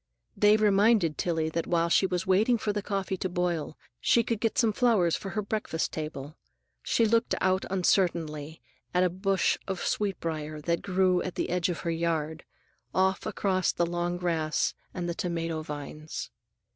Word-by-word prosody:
They 210 +1 +5
reminded 205 -5 +3
Tillie 160 -2 0
that 165 +1 -2
while 170 -1 +2
she 170 +3 +3
was 180 0 -2
waiting 210 +6 +3
for 210 -1 -1
the 205 - -2
coffee 195 -2 -2
to 185 - -2
boil 175 -3 -2 0.2
she 235 - +3
could 225 -1 -2
get 225 0 -1
some 225 -3 +3
flowers 205 -9 +3
for 195 - -5
her 210 +1 -2
breakfast 200 -6 -2
table. 150 -1 -5 0.5
She 230 - +2
looked 230 +2 +2
out 185 0 +1
uncertainly 165 -5 0 0.3
at 180 - +4
a 180 - +2
bush 190 +1 +1
of 190 -2 -3
sweet 200 -4 -1
briar 155 -2 -4
that 170 +2 0
grew 185 -2 +2
at 185 - -4
the - - -2
edge 180 +1 +1
of 175 - -3
her 170 - -1
yard, 160 -1 -2 0.5
off 190 0 +2
across 185 -2 +1
the 175 - 0
long 175 +1 -2
grass 165 -3 0 0.2
and 175 -2 -4
the 170 - -1
tomato 165 -2 -2
vines. 150 +1 -6
180 Hz, 175 wpm, -28 LUFS, 165-195 Hz, 0.5 s, They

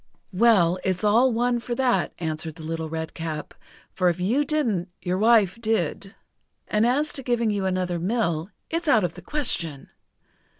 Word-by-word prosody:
"Well, 185 -4 +4
it's 185 0 -1
all 230 +5 +4
one 240 +1 +1
for 240 +1 -4
that," 255 -1 +1
answered 160 -1 -4
the 165 - -10
Little 160 0 -4
Redcap, 160 -1 -5 0.4
"for 180 -1 +2
if 175 - -2
you 230 +11 +2
didn't, 235 - -1
your 180 +1 -2
wife 220 -1 +4
did. 200 -2 -1 0.5
And 215 +2 +2
as 290 +5 +1
to 270 - -5
giving 235 -3 0
you 200 -2 -1
another 185 -2 -1
mill, 175 -4 -1 0.2
it's 330 0 -2
out 220 -8 +4
of 175 -2 -1
the 175 - -11
question. 170 - -2
195 Hz, 165 wpm, -24 LUFS, 170-235 Hz, 0.5 s, Well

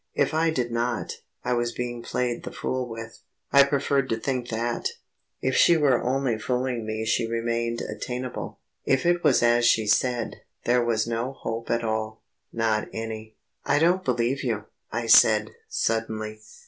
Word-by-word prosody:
If - - +1
I 160 +1 +2
did 125 -6 -1
not, 120 0 -2 0.3
I 125 - 0
was 120 0 0
being 120 -1 -4
played 120 0 -2
the - - -7
fool 130 -1 -3
with. 115 0 -8 0.3
I 140 0 +9
preferred 140 -1 +1
to 115 - 0
think 125 0 -2
that. 120 +1 -1 0.5
If 130 - 0
she 170 - +6
were 140 -5 +3
only 130 -3 0
fooling 125 -1 -2
me 110 0 -2
she 115 +1 +1
remained 115 0 -1
attainable. 125 0 -5 0.3
If 135 +3 +1
it 175 0 +2
was - - +4
as 120 0 +4
she 110 -2 +4
said, 120 +2 +1 0.3
there 120 0 +3
was 115 -2 +1
no 115 +3 -2
hope 115 -3 -5
at 115 0 +1
all 110 0 -3 0.3
not 110 -2 0
any. 110 -1 -6 0.3
"I 145 - +2
don't 175 +4 +3
believe 125 +2 0
you," 110 -5 -1 0.3
I 120 +1 -2
said, 110 -1 +6 0.2
suddenly. 110 -1 -2
120 Hz, 165 wpm, -25 LUFS, 115-130 Hz, 0.5 s, I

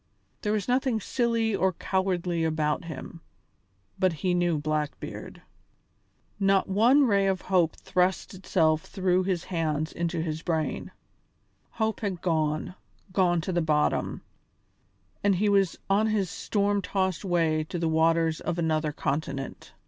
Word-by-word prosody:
There 210 - -1
was 210 -2 -1
nothing 250 -2 +1
silly 230 -1 0
or 190 -1 +1
cowardly 180 -2 -1
about 155 +1 0
him, 165 +1 -8 0.8
but 185 -1 +3
he 180 +3 -1
knew 175 -2 +2
Blackbeard. 150 0 -4 1.0
Not 195 -1 +3
one 235 +9 +5
ray 200 -4 +3
of 190 -1 0
hope 180 -4 +2
thrust 180 +2 0
itself 160 -4 +1
through 185 0 0
his 180 -3 -1
hands 155 -3 -2
into 170 0 -2
his 160 -1 -3
brain. 160 -3 -2 0.8
Hope 220 -1 -1
had 195 -5 -3
gone, 160 0 0 0.4
gone 175 -3 +3
to 185 - -3
the 175 - +2
bottom, 150 -2 0 1.0
and 200 -1 +4
he 205 +3 +2
was 195 -3 +2
on 205 +3 +3
his 205 -5 0
storm 205 -1 0
tossed 190 -1 -1
way 165 -4 +1
to 175 - -5
the 165 -1 0
waters 160 0 +2
of 170 - -2
another 155 -2 0
continent. 140 -1 -4
180 Hz, 140 wpm, -27 LUFS, 160-195 Hz, 1.0 s, one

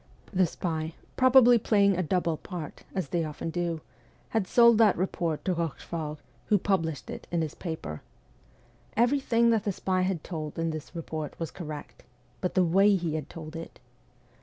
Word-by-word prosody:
The 185 -1 +4
spy, 160 -1 -3 0.2
probably 255 -2 +7
playing 200 -2 +3
a 185 - 0
double 170 -1 0
part 165 -1 -8
as 185 -7 -2
they 170 -1 0
often 155 +1 -4
do 170 -1 -2 0.5
had 220 -4 0
sold 235 0 +6
that 215 -4 +5
report 170 -3 -1
to 185 - +2
Eochefort, 165 -2 -3 0.3
who 210 - +4
published 165 - -1
it - - -8
in 170 -2 0
his 155 - -4
paper. 160 - -5 1.0
Everything 235 -1 +3
that 220 -3 +2
the 205 - 0
spy 185 0 0
had 185 -3 -1
told 155 -4 -5
in 165 0 0
this 155 +3 -7
report 155 -2 -5
was 165 -2 -3
correct 155 -5 -8 0.4
but 180 - -2
the 185 - +4
way 195 +4 +5
he 170 -4 -1
had 155 -2 -4
told 160 -1 -9
it 165 0 -8
175 Hz, 170 wpm, -28 LUFS, 160-195 Hz, 1.0 s, probably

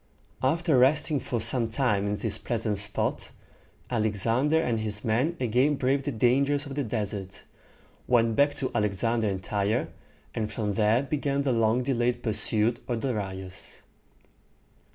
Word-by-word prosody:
After 155 +1 +2
resting 150 +3 +3
for 120 -1 -3
some 115 +1 +2
time 110 -5 0
in 105 - 0
this 105 0 -2
pleasant 110 -3 -2
spot, 105 +1 -1 0.6
Alexander 115 +7 +1
and 120 -8 0
his 105 -1 -4
men 130 +10 +1
again 125 +5 +2
braved 135 +1 0
the 145 - -1
dangers 140 +5 +2
of 140 - -7
the 145 +1 -1
desert, 100 -4 -4 0.6
went 115 -2 +3
back 145 +4 +3
to 130 - -3
Alexandria 110 +2 0
and 95 -1 -5
Tyre, 100 +3 -1 0.4
and 110 -1 -3
from 105 -2 -2
there 110 +4 +2
began 140 -1 -1
the 135 -2 +1
long 115 +2 +2
delayed 120 -2 0
pursuit 110 +1 0
of 120 -2 -2
Darius. 95 -7 -5
115 Hz, 145 wpm, -27 LUFS, 105-135 Hz, 0.6 s, resting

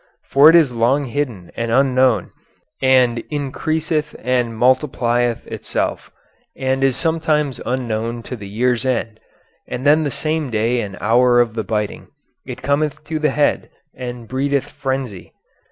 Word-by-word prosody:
For 140 +3 +8
it 165 - +6
is 160 -6 +5
long 125 +5 +1
hidden 120 -9 -4
and 115 0 -2
unknown, 130 -1 +3 0.5
and 130 -3 +4
increaseth 155 +2 -2
and 120 -2 -1
multiplieth 120 -2 +1
itself, - - -3 0.5
and 130 0 0
is 135 -2 +2
sometimes 155 -5 0
unknown 115 -2 -2
to 125 - -6
the 100 -4 -9
year's 120 +3 0
end, 115 -4 -2 0.5
and 130 - -5
then 150 +2 +5
the 150 - -1
same 155 0 -2
day 115 +2 0
and 100 -3 -6
hour 120 +3 +4
of 120 -2 +2
the 110 -1 -2
biting, 105 0 -3 0.4
it - - -7
cometh 145 +2 0
to 155 +1 -3
the 150 0 +2
head, 145 +2 0 0.2
and 125 -2 -7
breedeth 140 +2 -1
frenzy. 130 -8 -4
130 Hz, 145 wpm, -19 LUFS, 115-145 Hz, 0.5 s, For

